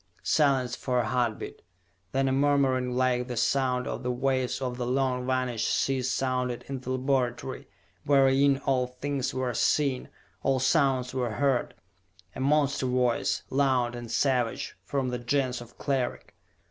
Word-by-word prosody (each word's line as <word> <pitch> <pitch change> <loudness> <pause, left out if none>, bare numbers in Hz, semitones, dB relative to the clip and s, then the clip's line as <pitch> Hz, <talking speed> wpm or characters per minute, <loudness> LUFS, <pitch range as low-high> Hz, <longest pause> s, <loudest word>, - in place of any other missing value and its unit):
Silence 135 -5 +2
for 125 -1 -2
a 120 - +1
heartbeat. 120 -2 -2 0.5
Then 135 0 +1
a - - +1
murmuring 135 -2 +2
like 125 -1 +1
the 125 -2 -5
sound 125 -1 +1
of - - -4
the 125 - -3
waves 130 0 0
of 125 -2 -3
the 120 -1 -3
long 130 -1 0
vanished 125 -3 0
seas 130 -2 0
sounded 125 -2 -1
in 135 -1 -4
the 130 - -8
laboratory, 130 -1 -1 0.4
wherein 135 0 +4
all 130 -2 +2
things 135 +1 -3
were 130 -1 -2
seen, 135 0 +1 0.3
all 135 -1 +2
sounds 130 -2 +2
were 125 -4 -1
heard. 135 +1 0 0.6
A - - -6
monster 140 -1 +2
voice, 125 -1 +1
loud 130 -3 +2
and 120 -1 -7
savage, 125 -4 0
from 135 -2 -1
the 125 0 -3
Gens 125 0 0
of 120 0 -13
Cleric. 135 -3 -2
130 Hz, 150 wpm, -28 LUFS, 125-135 Hz, 0.6 s, wherein